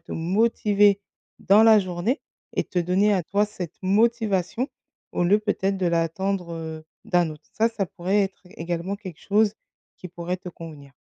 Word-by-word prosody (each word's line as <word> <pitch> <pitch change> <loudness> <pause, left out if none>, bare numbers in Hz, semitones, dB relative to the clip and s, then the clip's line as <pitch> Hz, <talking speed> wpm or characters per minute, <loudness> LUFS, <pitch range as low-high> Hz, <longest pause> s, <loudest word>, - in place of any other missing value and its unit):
te 165 - -10
motiver 205 +2 +3 0.4
dans 205 +3 +5
la 220 -1 +8
journée 185 - -2 0.3
et - - +1
te 180 - -3
donner 185 +4 +2
à 185 -3 +1
toi 205 +3 +1
cette 190 -5 -7
motivation 220 +2 +1 0.4
au 175 - 0
lieu 200 +4 +4
peut-être 200 -2 0
de 190 - -2
l'attendre, 170 +2 -1
heu, 160 -1 -6 0.2
d'un 175 -2 +2
autre 150 0 -11
ça 225 +1 +2
ça 215 -4 -2
pourrait 190 +5 0
être 195 -1 -4 0.2
également 170 +3 -3
quelque 185 -6 -10
chose 210 0 +2 0.5
qui 180 - -8
pourrait 175 +1 -4
te 180 0 -9
convenir. 150 -5 -11
190 Hz, 170 wpm, -24 LUFS, 170-210 Hz, 0.5 s, la